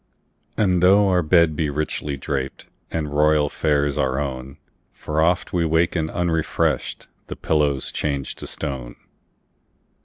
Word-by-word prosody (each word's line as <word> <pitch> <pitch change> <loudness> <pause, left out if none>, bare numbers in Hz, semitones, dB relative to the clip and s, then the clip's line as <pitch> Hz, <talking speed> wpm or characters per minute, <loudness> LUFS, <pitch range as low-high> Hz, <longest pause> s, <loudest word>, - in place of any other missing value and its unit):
And 90 -4 +2
tho 100 +3 +5
our 90 -1 +3
bed 85 -1 +3
be 75 0 0
richly 75 -1 -3
drapedAnd 70 +3 -5
royal 75 0 +3
fares 75 -1 0
our 65 -1 +1
own, 65 -1 -5 0.4
For 75 +1 -2
oft 90 +2 +1
we 85 -2 +2
waken 80 0 +1
unrefreshed—The 85 -2 -2
pillow's 75 -4 0
changed 70 -3 -3
to - - -6
stone! 65 -5 -5
75 Hz, 120 wpm, -22 LUFS, 70-85 Hz, 0.4 s, tho